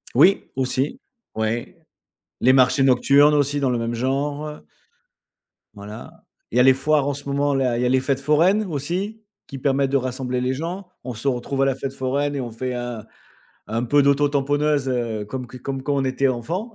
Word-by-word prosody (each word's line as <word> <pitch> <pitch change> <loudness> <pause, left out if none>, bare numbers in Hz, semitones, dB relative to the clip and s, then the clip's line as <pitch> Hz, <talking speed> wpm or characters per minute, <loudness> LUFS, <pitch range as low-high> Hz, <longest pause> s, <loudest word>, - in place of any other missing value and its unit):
Oui, 195 +2 +4
aussi, 130 - -1 0.4
ouais. 110 +2 -2 0.7
Les 130 - +5
marchés 130 +1 +4
nocturnes 140 +3 +5
aussi 145 0 +1
dans 135 -2 +1
le 120 - 0
même 115 0 -2
genre. 145 +4 -2 1.2
Voilà. 105 +1 -10 0.3
Il 120 - -1
y - - +6
a - - +7
les 130 +1 +7
foires 145 +1 +1
en 145 - 0
ce 140 +1 -7
moment 140 +1 +1
là, 130 -3 +1
il - - -1
y - - +2
a - - +2
les 130 +1 +3
fêtes 135 0 0
foraines 165 +9 +3
aussi 185 +7 -4 0.2
qui 140 - -7
permettent 135 0 +1
de 140 - +4
rassembler 130 -1 -2
les 130 +1 0
gens. 175 +7 -5 0.2
On 125 - -5
se 115 +5 -5
retrouve 135 +1 -1
à - - +3
la 135 -1 +1
fête 135 0 -5
foraine 140 +2 -1
et 135 - -2
on 120 -2 -5
fait 125 +3 -4
un 120 -3 -5 0.7
un 115 +2 0
peu 145 +4 +3
d'auto 140 +1 +3
tamponneuse, 145 0 +1
heu, 115 -4 -2
comme 125 +4 -5
q 125 +1 -11
comme 135 0 -4
quand 145 +1 0
on 135 - +1
était 130 +1 +1
enfant. 170 - -3
135 Hz, 205 wpm, -22 LUFS, 125-145 Hz, 1.2 s, a